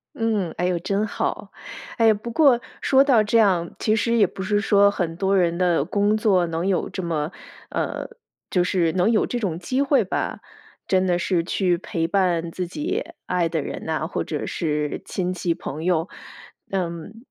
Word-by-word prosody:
嗯， 215 -7 0
哎 180 - 0
哟， 180 -1 0
真 200 +4 -1
好。 - - -3 0.4
哎， 225 -2 +5
不 215 +3 -5
过 265 -3 +4 0.2
说 270 0 +4
到 245 -6 +5
这 215 +2 +2
样， 180 -6 +3
其 215 - +1
实 230 +2 +1
也 210 -4 +5
不 190 - -8
是 205 +2 +1
说 200 -1 +4
很 170 -4 -3
多 195 +2 +1
人 170 -2 +2
的 175 -5 +2
工 205 +4 +1
作 195 -5 +3
能 165 +2 -2
有 195 -2 0
这 190 - -5
么 160 -2 -2 0.4
呃， - - -3 0.4
就 180 -2 +2
是 175 -3 +1
能 185 +5 +2
有 220 - +2
这 245 - -2
种 180 -7 -2
机 255 +10 -1
会 280 0 +3
吧， - - -3 0.5
真 185 -1 +2
的 175 -1 +2
是 175 -1 0
去 180 -1 +1
陪 165 -2 -2
伴 175 -3 +1
自 180 +1 -4
己 330 - -3 0.2
爱 180 -2 +1
的 165 -1 -1
人 - - -6
呐， 155 0 -2
或 - - -2
者 150 - -4
是 150 -2 -2
亲 180 -1 -2
戚、 170 -1 -1
朋 155 +2 -6
友。 175 -1 +1 0.6
嗯， 185 +5 -4
185 Hz, 200 characters per minute, -23 LUFS, 170-215 Hz, 0.6 s, 哎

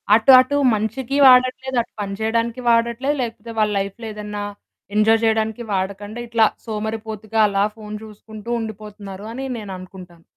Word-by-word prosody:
అటు 230 +4 +5
అటు 275 +3 +2 0.2
మంచికి 230 +6 -2
వాడట్లేదు, 255 0 +4
అటు - - -12
పని 200 -1 -4
చేయడానికి 230 +2 -1
వాడట్లేదు, 235 +5 +2
లేకపోతే 230 -1 -5
వాళ్ళ 210 -1 +2
లైఫ్‌లో 200 +4 -5
ఏదన్నా 210 -1 -5 0.5
ఎంజాయ్ 220 +1 +4
చేయడానికి 220 +1 0
వాడకండా, 200 +4 -3
ఇట్లా 230 -1 +4 0.2
సోమరిపోతుగా 220 0 -4
అలా 200 0 +1
ఫోన్ 210 -1 -7
చూసుకుంటూ 215 +1 -11
ఉండిపోతున్నారని 215 +3 -7
నేననుకుంటాను. 185 -4 -10
220 Hz, 125 wpm, -21 LUFS, 205-235 Hz, 0.5 s, అటు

